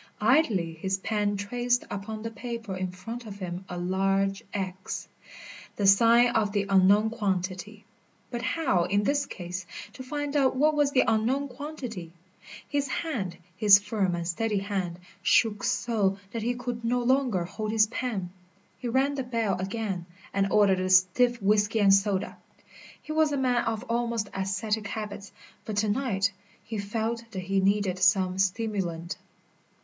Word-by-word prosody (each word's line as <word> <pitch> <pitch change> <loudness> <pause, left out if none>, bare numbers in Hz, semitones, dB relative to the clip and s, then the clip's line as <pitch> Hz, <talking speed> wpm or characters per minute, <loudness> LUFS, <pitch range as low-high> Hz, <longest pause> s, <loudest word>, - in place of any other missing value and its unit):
Idly 215 - +2
his 190 +4 -2
pen 205 0 -1
traced 245 +4 0
upon 215 +2 -5
the 225 - -4
paper 230 -2 -5
in 185 0 -2
front 225 +6 -8
of 200 -1 -8
him 180 -1 -6
a 180 - -5
large 195 +2 0
X, 190 -1 -4 0.7
the 205 - -1
sign 230 +5 +6
of 215 -4 0
the 200 -1 +1
unknown 200 +3 +4
quantity. 200 -1 -3 0.5
But 240 -1 -3
how, 255 - +1
in 205 +2 +1
this 280 +3 +1
case, 180 -1 -6 0.3
to - - -9
find 290 +2 -4
out 270 -3 +3
what 300 +4 +3
was 290 -2 +3
the 270 -2 +3
unknown 250 +6 +1
quantity? 245 - -7 0.5
His 285 -1 -1
hand, 240 - -3 0.2
his 200 +1 +8
firm 205 -3 -1
and 170 -1 -4
steady 210 +4 -1
hand, 195 -3 -2 0.2
shook 210 +2 +3
so 225 -6 +1
that 230 - -3
he 240 +3 -1
could 245 -1 -5
no 245 +1 +1
longer 250 -7 +2
hold 215 +4 -4
his 220 -1 +5
pen. 215 -6 -3 0.5
He 250 - -4
rang 265 +4 +2
the 270 -2 -2
bell 230 -5 0
again 190 -2 -3 0.3
and 195 0 +1
ordered 200 -3 +4
a 185 0 -1
stiff 185 +7 +4
whisky 210 +2 +2
and 200 -2 +6
soda. 195 -1 +1 0.6
He - - -9
was 310 -1 +3
a 285 - 0
man 250 -2 +1
of 225 -1 -2
almost 235 -3 -1
ascetic 200 +2 -2
habits, 205 -2 -6 0.3
but 215 -2 -5
to 210 +1 +2
night 205 -4 0 0.3
he 220 -2 -5
felt 225 +3 -2
that 190 -4 -5
he 195 +1 +1
needed 195 -1 +1
some 185 0 +3
stimulant. 190 -4 -1
210 Hz, 160 wpm, -27 LUFS, 190-240 Hz, 0.7 s, his